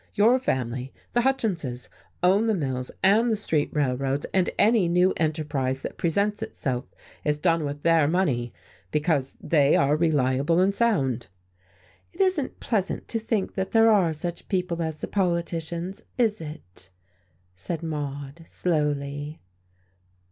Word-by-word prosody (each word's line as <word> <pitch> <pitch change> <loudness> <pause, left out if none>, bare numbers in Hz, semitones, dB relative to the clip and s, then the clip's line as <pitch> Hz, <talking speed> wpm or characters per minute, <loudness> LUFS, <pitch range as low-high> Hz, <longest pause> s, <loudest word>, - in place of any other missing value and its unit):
"Your 225 +5 +5
family, 130 - -2 0.2
the 240 - +3
Hutchinses, 180 - -1 0.4
own 195 +5 +4
the 220 - +2
mills 130 -6 -2
and 220 +5 +4
the - - +2
street 160 -8 0
railroads, 135 -1 0
and 185 -2 +2
any 215 -4 +4
new 180 +2 +3
enterprise 150 -5 -1
that - - -6
presents 200 +5 0
itself 125 -2 -3 0.4
is 150 0 +1
done 165 0 +2
with 145 0 -5
their 165 -3 +4
money, 140 -9 0 0.4
because 150 - 0
they 145 -2 +3
are 140 +2 +3
reliable 150 0 +2
and 190 +2 +3
sound." 135 - +1 0.9
"It - - -18
isn't 370 -8 +1
pleasant 205 -4 -2
to 230 - -1
think 220 -3 -1
that 190 -1 -3
there 225 0 +6
are 190 -6 +4
such 170 +3 -6
people 180 -3 -1
as 160 -2 -3
the - - -3
politicians, 170 -1 -2 0.2
is 220 -5 +1
it?" 120 - -10 0.7
said 165 - -5
Maude, 145 -1 -5
slowly. 145 -2 -2
165 Hz, 140 wpm, -25 LUFS, 140-195 Hz, 0.9 s, there